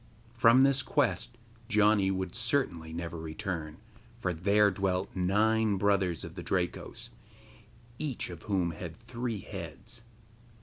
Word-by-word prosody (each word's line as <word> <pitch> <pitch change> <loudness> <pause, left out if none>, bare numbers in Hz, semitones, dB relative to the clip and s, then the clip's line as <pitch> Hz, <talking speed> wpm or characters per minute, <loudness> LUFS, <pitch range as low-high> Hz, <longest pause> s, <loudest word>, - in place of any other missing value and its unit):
From 120 +2 +6
this 140 0 +4
quest 130 -3 0 0.3
Janni 105 -3 +4
would 95 -1 -2
certainly 115 - 0
never 85 0 -5
return, 80 -1 -5 0.4
for 90 -6 -1
there 100 +5 +3
dwelt 95 0 -1
nine 105 +3 +2
brothers 95 -4 +1
of - - -9
the - - -7
Drakos, - - -3 0.9
each 135 -10 -3
of 85 -1 -9
whom 90 -4 +1
had 85 0 -7
three 115 -2 -4
heads. 100 +6 -8
100 Hz, 125 wpm, -30 LUFS, 90-115 Hz, 0.9 s, From